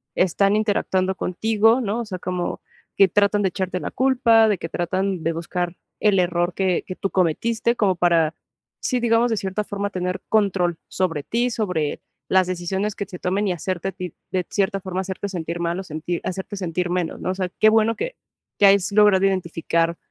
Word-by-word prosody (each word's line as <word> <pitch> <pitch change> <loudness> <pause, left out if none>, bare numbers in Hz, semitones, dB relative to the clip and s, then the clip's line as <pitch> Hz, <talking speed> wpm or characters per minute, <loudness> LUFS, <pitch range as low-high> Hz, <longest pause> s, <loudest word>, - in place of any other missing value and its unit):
están 195 +3 +2
interactuando 190 -3 +1
contigo, 220 +6 +2
¿no? 225 0 -1
O 235 - -3
sea, 185 -4 -6
como 180 0 -3 0.3
que 195 -2 +5
tratan 205 +1 +2
de 190 - +2
echarte 185 0 -3
la - - -4
culpa, 245 -4 +4
de 210 - +2
que 165 - -6
tratan 185 +1 -1
de 165 - 0
buscar 175 +1 -3 0.2
el 205 -3 +3
error 175 0 +1
que 185 -1 0
que 185 - -5
tú 195 - -2
cometiste, 220 +7 +1
como 195 -6 +1
para, 165 -3 +3 0.5
sí, 250 -2 -1
digamos, 235 +1 +3
de 225 - +1
cierta 195 +1 -3
forma, 200 0 -3
tener 180 -1 -3
control 190 -5 +2
sobre 165 -6 -1
ti, 240 +8 0
sobre 180 -10 -2 0.3
las 185 -1 +4
decisiones 190 +3 -2
que - - -3
se 180 -3 -10
tomen 195 +3 0
y 195 - +1
hacerte 180 +1 -3
a - - -6
ti, 180 -3 -7 0.2
de 185 -2 -1
cierta 195 -1 0
forma, 185 0 -3
hacerte 190 +1 -4
sentir 170 -3 -4
mal 170 0 -1
o - - -9
sentir 165 0 -4
hacerte 190 +2 -4
sentir 180 -2 -2
menos, 175 -2 -2
¿no? 185 - -2
O 185 - -3
sea, 185 -2 -2
qué 215 - +6
bueno 220 +1 +3
que - - -4 0.4
que 205 - +6
hayas 195 -2 +4
logrado 205 -2 +5
identificar 170 -3 0
190 Hz, 195 wpm, -22 LUFS, 175-205 Hz, 0.5 s, qué